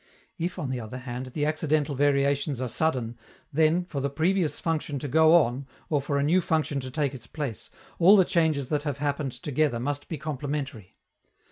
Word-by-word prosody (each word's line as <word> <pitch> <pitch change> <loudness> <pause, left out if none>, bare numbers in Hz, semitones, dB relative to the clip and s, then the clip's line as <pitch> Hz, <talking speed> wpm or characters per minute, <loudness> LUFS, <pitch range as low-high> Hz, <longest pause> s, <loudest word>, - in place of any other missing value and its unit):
If, 175 +3 -2
on 145 -7 -3
the 130 - -2
other 115 +2 -7
hand, 130 0 -6
the 145 +3 -2
accidental 155 -1 0
variations 140 0 +1
are 130 - -1
sudden, 120 -4 -1 0.3
then, 160 +4 +3
for 150 -5 -4
the 140 - 0
previous 165 +3 0
function 155 -3 -2
to 145 - -4
go 160 +4 +5
on 135 -4 +2 0.2
or 145 -2 +2
for 140 +1 -1
a 140 - +1
new 170 +6 +3
function 155 -4 0
to 130 -1 -6
take 140 0 -1
its 115 -4 -9
place, 140 -7 -5 0.3
all 190 +5 +8
the 190 - +5
changes 160 -7 +1
that 150 -2 0
have 145 -2 -3
happened 145 -2 -2
together 135 0 0
must 145 +3 -3
be 160 - -3
complementary. 140 -7 -5
145 Hz, 195 wpm, -27 LUFS, 130-155 Hz, 0.3 s, all